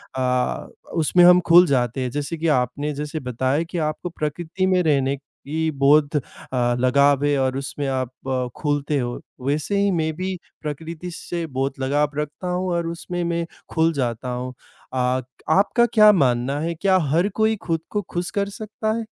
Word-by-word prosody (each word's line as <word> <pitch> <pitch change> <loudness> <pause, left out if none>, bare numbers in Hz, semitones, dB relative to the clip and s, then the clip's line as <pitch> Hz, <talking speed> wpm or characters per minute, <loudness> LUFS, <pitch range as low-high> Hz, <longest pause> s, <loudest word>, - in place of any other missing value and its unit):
अ, 125 -1 0 0.3
उसमें 170 +2 +4
हम 180 0 +8
खुल 175 +2 +9
जाते 125 -1 +1
हैं। 125 - -2
जैसे 145 +4 -3
कि 165 - -1
आपने 145 +4 -2
जैसे 150 +2 -4
बताया 130 +4 0
कि 170 +1 -6
आपको 175 +3 -5
प्रकृति 165 +4 -3
में 185 -1 +3
रहने 140 -3 +2 0.3
की 160 +2 0
बहुत 145 +2 +3
अ, - - 0 0.6
लगाव 140 +2 +4
है 145 -1 +2
और 130 0 0
उसमें 140 +1 -4
आप 130 -2 -1 0.2
अ, 130 -1 0
खुलते 145 -1 0
हो, 120 -1 -3 0.3
वैसे 150 +8 0
ही 200 0 +3
मैं 160 -2 0
भी 185 +1 -3 0.3
प्रकृति 160 +3 -6
से 170 0 -4
बहुत 135 -1 -3
लगाव 145 +3 +1
रखता 150 +4 -4
हूँ 180 +1 -1
और 170 -1 -1
उसमें 175 +1 -4
मैं 170 0 -1 0.2
खुल 165 0 +2
जाता 125 -2 -2
हूँ। 125 +1 -4 0.4
अ, 130 0 +1 0.3
आपका 205 +7 +4
क्या 215 -1 +8
मानना 135 -5 +1
है, 165 +2 -1
क्या 190 +3 +3
हर 170 +5 +3
कोई 220 0 +2
खुद 165 -2 0
को 210 - -1
खुश 175 0 -3
कर 200 0 -1
सकता 215 +1 -4
है? 230 - -4
150 Hz, 180 wpm, -22 LUFS, 135-175 Hz, 0.6 s, खुल